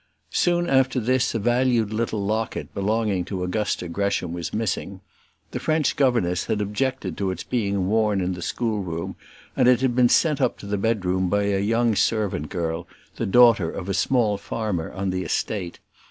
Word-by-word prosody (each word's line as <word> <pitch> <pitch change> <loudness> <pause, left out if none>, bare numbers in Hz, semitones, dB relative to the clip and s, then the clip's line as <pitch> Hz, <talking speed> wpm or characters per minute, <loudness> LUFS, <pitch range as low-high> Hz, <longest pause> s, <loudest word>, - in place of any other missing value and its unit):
Soon 175 0 +2
after 130 -2 +3
this 125 +1 +1
a - - +3
valued 120 -1 +1
little 110 -2 -1
locket 110 +2 -2
belonging 105 -2 0
to 95 -1 -4
Augusta 90 0 -1
Gresham 90 -1 -1
was 85 -1 -4
missing. 100 -3 -2 0.5
The - - -3
French 155 -2 +1
governess 115 -10 +1
had 105 - -1
objected 130 +6 -2
to 100 -2 0
its 95 -2 -4
being 100 -6 -1
worn 105 -1 +2
in 90 0 -1
the 90 - -7
schoolroom, 95 -4 -3 0.4
and - - +3
it 125 -1 +5
had 130 -2 +1
been 125 -1 +5
sent 155 0 +3
up - - +1
to - - -11
the 100 0 -2
bedroom 95 -4 0
by 100 +2 +1
a 100 -1 +1
young 115 +2 +2
servant 100 -9 0
girl, 85 -1 -3 0.3
the - - -2
daughter 115 -5 +5
of 90 +1 -6
a 100 - -1
small 105 +1 +1
farmer 100 -6 -3
on 95 -1 -2
the 90 0 -2
estate. 95 -2 -2
105 Hz, 180 wpm, -24 LUFS, 95-120 Hz, 0.5 s, it